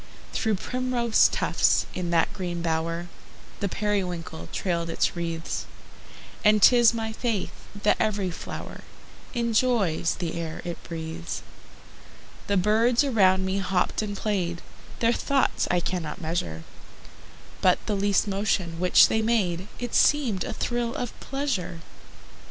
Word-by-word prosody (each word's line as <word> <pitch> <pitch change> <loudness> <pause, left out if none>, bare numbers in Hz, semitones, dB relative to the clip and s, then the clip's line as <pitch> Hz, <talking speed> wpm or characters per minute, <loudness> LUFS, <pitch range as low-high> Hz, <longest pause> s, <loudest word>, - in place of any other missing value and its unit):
Through 220 -1 +1
primrose 250 +1 +2
tufts, - - +2
in 180 -2 -3
that 170 +3 +2
green 175 -4 -4
bower, 165 +1 -1 0.5
The 200 - -1
periwinkle 180 - -3
trailed 170 -3 -1
its 165 - 0
wreaths; 165 -1 -3 0.8
And 210 0 +5
'tis 240 +2 +7
my 225 -1 -3
faith 225 -4 -2 0.3
that 210 - +4
every 205 -4 0
flower - - -7 0.5
Enjoys 230 -8 +1
the 170 -3 -4
air 160 -1 -6
it 175 -1 -5
breathes. 165 0 -5 1.0
The 200 - +2
birds 225 +7 +3
around 190 -8 +3
me 190 +1 0
hopped 185 0 0
and 205 -2 -4
played, 180 -5 -2 0.4
Their 230 0 +4
thoughts 275 +2 +1
I 180 - +3
cannot 175 -3 -3
measure: 155 - -3 1.0
But 180 -1 +5
the 215 - -1
least 200 +1 +2
motion 195 -4 -1
which 180 0 +6
they 220 - +1
made 200 -5 0
It 245 -1 -5
seemed 255 -11 +3
a - - -4
thrill 240 -1 -2
of 245 -2 -3
pleasure. 255 -12 -3
195 Hz, 130 wpm, -26 LUFS, 170-225 Hz, 1.0 s, tis